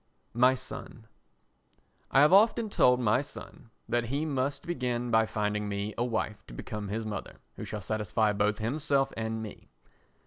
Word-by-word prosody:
My 125 +3 +5
Son 125 -3 -9 1.0
I 135 - +5
have 150 +5 +6
often 220 +2 +5
told 125 -7 +4
my 120 +1 +3
son 140 -4 -11 0.2
that 120 +1 0
he 140 +6 -1
must 140 -2 -2
begin 125 -7 -2
by 110 0 +4
finding 105 -1 -1
me 100 +1 -3
a 120 - 0
wife 110 -3 -2
to - - -10
become 105 - -5
his 110 +3 -3
mother 105 -3 -5 0.2
who - - -7
shall 105 -1 -5
satisfy 105 +1 0
both 105 +1 +1
himself 140 +4 0
and 110 0 -3
me. 105 - -10
115 Hz, 165 wpm, -29 LUFS, 105-130 Hz, 1.0 s, have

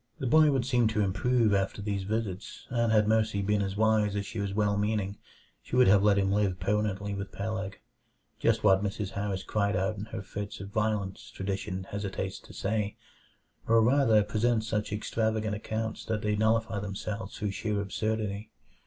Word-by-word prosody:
The - - -4
boy 155 +4 +6
would 135 -4 +1
seem 125 -3 +3
to 110 -1 0
improve 115 +3 +2
after 100 +1 0
these 100 -1 -2
visits, 105 -2 -4
and 115 -2 +2
had 105 -1 +4
Mercy 110 -2 +2
been 105 +1 +1
as 100 0 -2
wise 110 -2 +3
as 100 -1 -1
she 110 - -6
was 100 -1 -1
well 105 0 +1
meaning, 105 -1 -1 0.4
she - - -5
would 125 0 +6
have 100 +1 +6
let 100 -1 +4
him 95 -1 +2
live 100 -3 +1
permanently 100 -1 -1
with 100 0 -5
Peleg. 100 -2 -4 0.6
Just 115 -1 +2
what 95 -1 +5
Mrs. 100 -1 -3
Harris 100 -2 -3
cried 100 -2 0
out 95 +3 0
in 100 - -5
her 100 -3 -6
fits 100 +1 -6
of 95 +1 -7
violence, 105 0 -2
tradition 95 -1 -4
hesitates 95 -1 -4
to - - -15
say; 105 0 -2 0.7
or 115 0 +5
rather, 115 -2 +4
presents 110 +1 +1
such 105 -2 -1
extravagant 110 0 -1
accounts 110 +1 -3
that 110 -2 -2
they 105 0 +1
nullify 110 0 +1
themselves 100 +2 -5
through 105 -2 -2
sheer 105 +1 -2
absurdity. 105 +1 -2
105 Hz, 180 wpm, -29 LUFS, 100-110 Hz, 0.7 s, boy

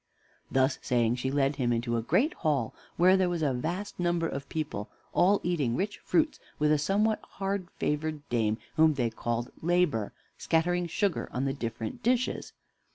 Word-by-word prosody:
Thus 130 +1 +2
saying, 120 -1 +1
she 130 +1 -1
led 140 0 +1
him 125 -3 +1
into 120 0 0
a 115 - +1
great 180 - +2
hall, 140 -7 0 0.2
where 185 +2 +6
there 185 -2 +2
was 170 -2 -1
a 140 -3 +2
vast 175 +12 -3
number 175 -1 +1
of 140 -2 -5
people, 145 -10 -3 0.2
all 195 +3 +4
eating 150 -9 0
rich 205 +8 -2
fruits, 315 -2 +1 0.2
with 150 0 +2
a 155 - +4
somewhat 210 +7 +2
hard 195 -2 -2
favored 150 0 -2
dame, 110 -3 +1 0.2
whom 155 -1 +5
they 120 -4 0
called 120 +2 -3
Labor, 165 - +1 0.3
scattering 175 +2 +1
sugar 195 +2 -1
on 130 +2 -1
the 135 - 0
different 115 - -5
dishes. 245 +1 0
150 Hz, 170 wpm, -29 LUFS, 125-180 Hz, 0.3 s, where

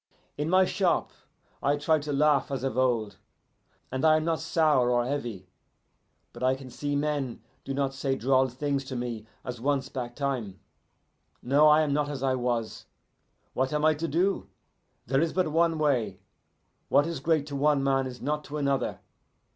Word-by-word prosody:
In 150 +2 -2
my 185 +1 +5
shop 185 -2 0 0.5
I 145 +1 +2
try 155 +2 +2
to 145 0 -5
laugh 145 0 +3
as 135 -2 -3
of 135 -4 -2
old, 115 -6 0 0.7
and 130 +2 -3
I 155 -1 +6
am 155 - -2
not 165 -1 0
sour 155 -6 +2
or 120 -1 +2
heavy, 120 -9 -4 0.9
but 120 - -11
I 130 +1 +3
can 130 -1 -11
see 145 +3 -3
men 145 -4 -2 0.2
do 135 - -4
not 135 -1 0
say 135 0 -1
droll 130 +1 +3
things 140 +2 -2
to 130 -1 -6
me 120 -3 -4 0.2
as 125 -2 -6
once 140 0 0
back 120 -2 -5
time. 125 -9 -3 0.8
No, 145 +4 +5
I 150 +1 +6
am 150 -2 0
not 145 0 0
as 140 -2 -5
I 135 -1 +2
was. 120 -3 -2 0.7
What 130 0 0
am 150 0 +1
I 155 - +5
to 160 +2 -3
do? 180 +6 0 0.6
There 135 +3 +1
is 165 -1 0
but 185 -4 +1
one 165 0 +2
way. 120 -11 0 0.7
What 145 - +4
is 165 -2 -3
great 155 0 +1
to 145 -1 -6
one 145 0 +2
man 135 -1 +1
is 125 -1 -9
not 150 +2 -1
to 150 - -5
another. 140 -2 -1
140 Hz, 185 wpm, -27 LUFS, 130-150 Hz, 0.9 s, I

